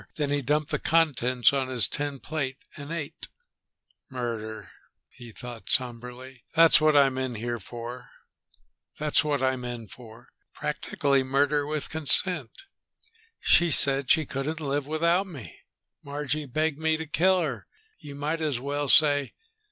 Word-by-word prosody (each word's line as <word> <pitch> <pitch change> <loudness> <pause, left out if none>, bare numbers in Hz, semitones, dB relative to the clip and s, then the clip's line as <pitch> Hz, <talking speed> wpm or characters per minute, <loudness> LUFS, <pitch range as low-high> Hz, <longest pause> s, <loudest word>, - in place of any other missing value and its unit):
Then 145 -2 -2
he 145 0 0
dumped 150 +3 -1
the - - -1
contents 130 -7 +2
on 135 -2 0
his 125 -6 +2
tin 145 -2 -4
plate 140 -3 -4 0.2
and 145 +2 -8
ate. 165 -2 -5 0.8
"Murder," 115 -4 -5 0.4
he 120 -1 -12
thought 120 0 -9
somberly. 125 -1 -3
"That's 165 -1 +6
what 155 -1 +4
I'm 135 -2 +3
in 130 -2 -3 0.2
for. 120 +4 -9 0.9
Practically 130 -1 -2
murder 140 +2 +1
with 150 -1 -3
consent. 155 - +2 0.8
She 175 0 +4
said 140 -3 +5
she 160 - +4
couldn't 140 +5 -4
live 145 -2 -2
without 170 +5 +1
me. 130 - -11 0.4
Margie 145 +1 -4
begged 155 +3 -1
me 160 0 +1
to 160 - -5
kill 185 +5 +2
her, 135 -9 -4 0.3
you 145 -5 -10
might 150 +3 -3
as 150 -6 -1
well 145 +2 -3
say. 145 -2 +4
140 Hz, 130 wpm, -26 LUFS, 125-155 Hz, 0.9 s, That's